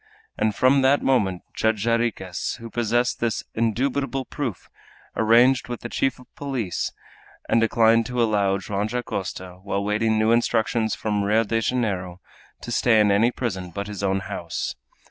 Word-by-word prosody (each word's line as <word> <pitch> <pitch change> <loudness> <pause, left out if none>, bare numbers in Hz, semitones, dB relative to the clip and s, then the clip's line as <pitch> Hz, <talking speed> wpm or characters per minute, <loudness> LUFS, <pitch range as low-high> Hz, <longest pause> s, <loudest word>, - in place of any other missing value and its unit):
And 110 -1 0
from 130 +4 +4
that 135 +2 +3
moment 100 -9 +1
Judge 110 -2 0
Jarriquez, 115 -7 -1
who 115 -2 -10
possessed 120 +1 0
this 115 -2 -1
indubitable 130 +4 -1
proof, 125 -10 -5 0.5
arranged 120 +4 +4
with 120 -1 -5
the 120 - -6
chief 135 +2 0
of 125 - -15
the - - -54
police, 125 - -2 0.6
and 115 - +3
declined 115 0 +3
to 125 -1 -3
allow 100 -4 +2
Joam 100 +1 -2
Dacosta, 95 -6 -5
while 100 0 -2
waiting 110 +2 +1
new 110 +1 +3
instructions 115 -1 +1
from 105 -2 -1
Rio 105 +3 +3
Janeiro, 105 -5 -1 0.4
to - - -7
stay 115 -2 +3
in 105 -1 +4
any 105 +4 +4
prison 95 -8 -4
but 100 +4 -5
his 105 -1 -6
own 95 -1 0
house. 85 -3 -4
110 Hz, 160 wpm, -24 LUFS, 100-120 Hz, 0.6 s, from